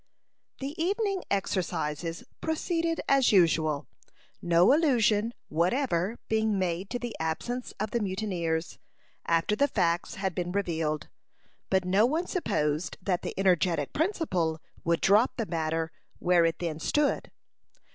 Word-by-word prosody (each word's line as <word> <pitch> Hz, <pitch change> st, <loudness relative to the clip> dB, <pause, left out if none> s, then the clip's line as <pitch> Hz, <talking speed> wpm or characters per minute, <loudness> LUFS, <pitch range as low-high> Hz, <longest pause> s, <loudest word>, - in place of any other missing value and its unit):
The 275 Hz, +2 st, -3 dB
evening 395 Hz, 0 st, 0 dB
exercises 170 Hz, -4 st, -2 dB, 0.2 s
proceeded 330 Hz, +1 st, -1 dB
as 275 Hz, -2 st, +4 dB
usual, 155 Hz, -6 st, +3 dB, 0.6 s
no 175 Hz, +7 st, +5 dB
allusion 230 Hz, -8 st, +3 dB, 0.2 s
whatever 185 Hz, -, 0 dB
being 220 Hz, -2 st, +1 dB
made 185 Hz, +1 st, -1 dB
to 245 Hz, -, -2 dB
the 240 Hz, -1 st, -5 dB
absence 235 Hz, +11 st, -3 dB
of 215 Hz, +1 st, -2 dB
the 235 Hz, -, +1 dB
mutineers, 185 Hz, -5 st, -2 dB, 0.5 s
after 165 Hz, +5 st, +2 dB
the 285 Hz, +5 st, +3 dB
facts 175 Hz, -8 st, 0 dB
had 190 Hz, -1 st, -2 dB
been 175 Hz, +1 st, -3 dB
revealed. 160 Hz, -6 st, -1 dB, 0.6 s
But 190 Hz, -1 st, +2 dB
no 195 Hz, +5 st, +4 dB
one 320 Hz, +6 st, 0 dB
supposed 170 Hz, -, -1 dB
that 180 Hz, -2 st, -1 dB
the -, -, -5 dB
energetic 175 Hz, -5 st, +2 dB
principal 190 Hz, -, 0 dB, 0.2 s
would 170 Hz, 0 st, +1 dB
drop 210 Hz, +6 st, +4 dB
the 230 Hz, -, -1 dB
matter 160 Hz, -2 st, -2 dB, 0.3 s
where 175 Hz, -1 st, +3 dB
it 165 Hz, 0 st, 0 dB
then 165 Hz, -3 st, -3 dB
stood. 295 Hz, -, +1 dB
190 Hz, 130 wpm, -28 LUFS, 165-240 Hz, 0.6 s, no